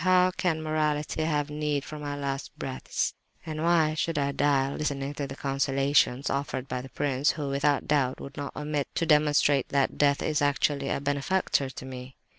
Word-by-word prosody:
How 185 Hz, 0 st, +5 dB
can 160 Hz, -3 st, 0 dB
morality 155 Hz, 0 st, 0 dB
have 150 Hz, -2 st, 0 dB
need 150 Hz, -1 st, -1 dB
of 150 Hz, -1 st, -6 dB
my 145 Hz, -1 st, -3 dB
last 140 Hz, -1 st, -3 dB
breaths, 130 Hz, -1 st, -2 dB, 0.3 s
and 155 Hz, -1 st, -4 dB
why 165 Hz, -2 st, +3 dB
should 160 Hz, 0 st, -1 dB
I 140 Hz, -1 st, +1 dB
die 140 Hz, -1 st, +2 dB
listening 140 Hz, -2 st, -2 dB
to 140 Hz, -1 st, -4 dB
the 135 Hz, -, -7 dB
consolations 135 Hz, -1 st, +1 dB
offered 140 Hz, -1 st, -2 dB
by 125 Hz, -, -3 dB
the 135 Hz, -, -10 dB
prince, 140 Hz, +1 st, +1 dB
who, 145 Hz, -3 st, -4 dB
without 140 Hz, +1 st, +1 dB
doubt, 135 Hz, -4 st, +1 dB
would 140 Hz, +1 st, -9 dB
not 145 Hz, -, -5 dB
omit 150 Hz, -1 st, -2 dB
to 165 Hz, -, +1 dB
demonstrate 150 Hz, -3 st, +3 dB
that 140 Hz, -1 st, +1 dB
death 140 Hz, -1 st, +3 dB
is 155 Hz, -2 st, 0 dB
actually 145 Hz, -1 st, +1 dB
a -, -, 0 dB
benefactor 140 Hz, +1 st, 0 dB
to 130 Hz, -, -9 dB
me? 130 Hz, 0 st, -8 dB
145 Hz, 185 wpm, -28 LUFS, 135-150 Hz, 0.3 s, How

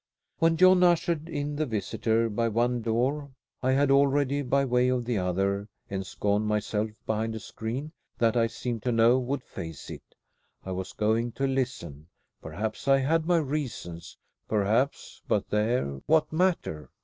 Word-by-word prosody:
When 165 Hz, 0 st, +3 dB
John 185 Hz, +1 st, +6 dB
ushered 170 Hz, -2 st, +2 dB
in 145 Hz, -1 st, -3 dB
the 155 Hz, 0 st, 0 dB
visitor 110 Hz, +1 st, 0 dB
by 115 Hz, +2 st, 0 dB
one 120 Hz, +2 st, +1 dB
door 130 Hz, +6 st, 0 dB, 0.3 s
I 130 Hz, +1 st, +2 dB
had 140 Hz, +1 st, +3 dB
already, 140 Hz, 0 st, +3 dB
by 140 Hz, +1 st, +1 dB
way 125 Hz, 0 st, +2 dB
of 125 Hz, -2 st, 0 dB
the 120 Hz, -4 st, 0 dB
other, 95 Hz, +2 st, 0 dB, 0.2 s
ensconced 100 Hz, +2 st, -1 dB
myself 105 Hz, 0 st, -1 dB, 0.2 s
behind 110 Hz, +1 st, -1 dB
a -, -, -4 dB
screen, 120 Hz, +8 st, -5 dB, 0.3 s
that 115 Hz, -1 st, +2 dB
I 115 Hz, -1 st, +3 dB
seemed 115 Hz, 0 st, -4 dB
to 125 Hz, -, 0 dB
know 115 Hz, +2 st, +5 dB
would 130 Hz, +1 st, -3 dB
face 80 Hz, -5 st, -8 dB
it. -, -, -11 dB, 0.5 s
I 95 Hz, -, -5 dB
was 95 Hz, 0 st, -4 dB
going 110 Hz, +2 st, 0 dB
to 135 Hz, -, -1 dB
listen. 130 Hz, -, -3 dB, 0.3 s
Perhaps 105 Hz, -, -5 dB
I 135 Hz, 0 st, +6 dB
had 155 Hz, +4 st, +1 dB
my 175 Hz, -1 st, +4 dB
reasons. 135 Hz, -, -4 dB, 0.3 s
Perhaps 110 Hz, +6 st, 0 dB
but -, -, 0 dB
there, 105 Hz, -, 0 dB
what 160 Hz, 0 st, +3 dB
matter? 165 Hz, -, 0 dB
120 Hz, 160 wpm, -27 LUFS, 105-140 Hz, 0.5 s, John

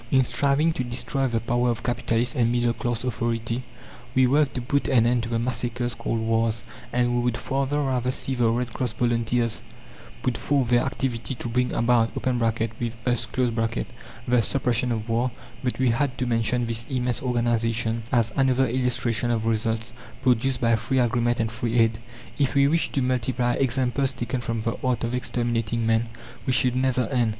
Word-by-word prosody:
In 130 Hz, 0 st, +4 dB
striving 145 Hz, +5 st, +2 dB
to 130 Hz, -, -2 dB
destroy 125 Hz, +2 st, -1 dB
the 115 Hz, -2 st, 0 dB
power 120 Hz, +2 st, +1 dB
of 115 Hz, -1 st, -2 dB
capitalist 120 Hz, 0 st, 0 dB
and 120 Hz, -5 st, +2 dB
middle 120 Hz, -1 st, +2 dB
class 120 Hz, 0 st, -2 dB
authority, 115 Hz, -1 st, -1 dB, 0.5 s
we 130 Hz, 0 st, +5 dB
work 140 Hz, +2 st, +3 dB
to 125 Hz, -, -3 dB
put 140 Hz, +3 st, 0 dB
an 120 Hz, -4 st, +4 dB
end 120 Hz, 0 st, +2 dB
to 115 Hz, -, -5 dB
the 115 Hz, -, 0 dB
massacres 120 Hz, 0 st, -2 dB
called 115 Hz, 0 st, -2 dB
wars, 115 Hz, 0 st, +1 dB, 0.3 s
and 120 Hz, 0 st, +1 dB
we 120 Hz, -, +2 dB
would 120 Hz, -1 st, 0 dB
far 135 Hz, 0 st, -1 dB
rather 135 Hz, -3 st, 0 dB
see 130 Hz, +1 st, -1 dB
the 120 Hz, -3 st, +2 dB
Red 120 Hz, +1 st, -1 dB
Cross 125 Hz, -4 st, -2 dB
volunteers 115 Hz, 0 st, 0 dB, 0.6 s
put 125 Hz, -2 st, 0 dB
forth 135 Hz, -4 st, +1 dB
their 120 Hz, -1 st, +4 dB
activity 130 Hz, -2 st, -2 dB
to 120 Hz, -, -5 dB
bring 125 Hz, +2 st, 0 dB
about 115 Hz, -1 st, +2 dB
(with -, -, -5 dB, 0.8 s
us) 120 Hz, -2 st, +1 dB
the 120 Hz, 0 st, -1 dB
suppression 125 Hz, 0 st, 0 dB
of 110 Hz, -1 st, -2 dB
war; 120 Hz, +2 st, +1 dB, 0.3 s
but 125 Hz, -, -1 dB
we 130 Hz, -2 st, +3 dB
had 130 Hz, +2 st, 0 dB
to 125 Hz, -, -1 dB
mention 120 Hz, +1 st, +1 dB
this 115 Hz, 0 st, -3 dB
immense 125 Hz, -2 st, -1 dB
organization 115 Hz, -2 st, 0 dB
as 115 Hz, -3 st, +2 dB
another 135 Hz, -1 st, +3 dB
illustration 120 Hz, -1 st, 0 dB
of 115 Hz, -2 st, 0 dB
results 115 Hz, +1 st, -1 dB, 0.3 s
produced 125 Hz, 0 st, +2 dB
by 115 Hz, -2 st, +3 dB
free 130 Hz, +4 st, -1 dB
agreement 120 Hz, -1 st, +2 dB
and 115 Hz, -1 st, 0 dB
free 115 Hz, +1 st, -2 dB
aid. 115 Hz, -1 st, +3 dB, 0.4 s
If 140 Hz, 0 st, +1 dB
we 140 Hz, 0 st, +5 dB
wished 165 Hz, +3 st, +1 dB
to 135 Hz, -, +1 dB
multiply 125 Hz, -1 st, 0 dB
examples 130 Hz, 0 st, +1 dB
taken 120 Hz, 0 st, -3 dB
from 115 Hz, -1 st, -2 dB
the 115 Hz, +1 st, -2 dB
art 125 Hz, -2 st, 0 dB
of 115 Hz, +1 st, -1 dB
exterminating 120 Hz, -2 st, -1 dB
men 115 Hz, +1 st, +2 dB, 0.4 s
we 130 Hz, -, +2 dB
should 125 Hz, 0 st, +2 dB
never 130 Hz, -1 st, +2 dB
end. 120 Hz, -4 st, +2 dB
120 Hz, 180 wpm, -25 LUFS, 115-130 Hz, 0.8 s, we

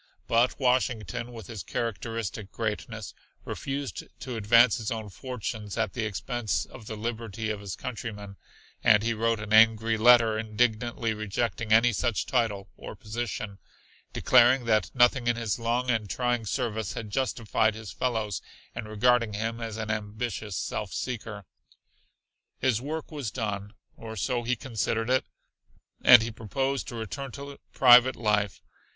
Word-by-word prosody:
But 120 Hz, +2 st, +2 dB
Washington 125 Hz, -4 st, 0 dB
with 115 Hz, -4 st, -9 dB
his 105 Hz, +1 st, -7 dB
characteristic 115 Hz, -2 st, -4 dB
greatness 110 Hz, -1 st, -4 dB, 0.3 s
refused 140 Hz, 0 st, -4 dB, 0.2 s
to 125 Hz, -2 st, -5 dB
advance 115 Hz, +2 st, +5 dB
his 110 Hz, -3 st, -3 dB
own 110 Hz, -2 st, -4 dB
fortunes 110 Hz, -3 st, -5 dB
at 100 Hz, -, 0 dB
the 115 Hz, -3 st, -2 dB
expense 110 Hz, +2 st, -2 dB
of 110 Hz, -5 st, -13 dB
the 110 Hz, -, -5 dB
liberty 110 Hz, -1 st, -4 dB
of 105 Hz, -, -4 dB
his 100 Hz, -2 st, -6 dB
countrymen, 105 Hz, -5 st, -6 dB, 0.5 s
and 105 Hz, 0 st, +5 dB
he 115 Hz, 0 st, +1 dB
wrote 115 Hz, 0 st, 0 dB
an 105 Hz, 0 st, -4 dB
angry 110 Hz, 0 st, +5 dB
letter 115 Hz, -2 st, +6 dB
indignantly 115 Hz, +1 st, 0 dB
rejecting 110 Hz, +1 st, -2 dB
any 115 Hz, +2 st, +5 dB
such 115 Hz, +1 st, 0 dB
title 110 Hz, -6 st, 0 dB
or -, -, -9 dB
position, 105 Hz, -2 st, -5 dB, 0.5 s
declaring 125 Hz, 0 st, +5 dB
that 110 Hz, -4 st, +2 dB
nothing 120 Hz, 0 st, +4 dB
in 120 Hz, -, +3 dB
his 115 Hz, -2 st, -2 dB
long 120 Hz, +2 st, 0 dB
and 110 Hz, -3 st, -1 dB
trying 120 Hz, -2 st, -1 dB
service 110 Hz, -5 st, -2 dB
had 110 Hz, -2 st, -6 dB
justified 110 Hz, -3 st, 0 dB
his 110 Hz, -2 st, -8 dB
fellows 110 Hz, -7 st, -2 dB, 0.3 s
in 115 Hz, -2 st, -5 dB
regarding 115 Hz, +1 st, +2 dB
him 115 Hz, +2 st, -3 dB
as 110 Hz, -1 st, -5 dB
an 110 Hz, -1 st, -3 dB
ambitious 105 Hz, -1 st, -4 dB
self 100 Hz, -4 st, -3 dB
seeker. 105 Hz, -2 st, -5 dB, 1.1 s
His 125 Hz, -3 st, +1 dB
work 155 Hz, +4 st, -5 dB
was 145 Hz, -7 st, -4 dB
done, 105 Hz, -3 st, -4 dB, 0.2 s
or 110 Hz, -1 st, -8 dB
so 120 Hz, +5 st, -1 dB
he 120 Hz, +1 st, 0 dB
considered 115 Hz, 0 st, -2 dB
it, 130 Hz, -, +2 dB, 0.8 s
and 120 Hz, -2 st, +9 dB
he 115 Hz, -, -3 dB
proposed 135 Hz, +5 st, -2 dB
to 120 Hz, -, -6 dB
return 115 Hz, +5 st, -5 dB
to 140 Hz, 0 st, -8 dB
private 125 Hz, 0 st, +7 dB
life. 105 Hz, -3 st, 0 dB
115 Hz, 150 wpm, -27 LUFS, 105-120 Hz, 1.1 s, and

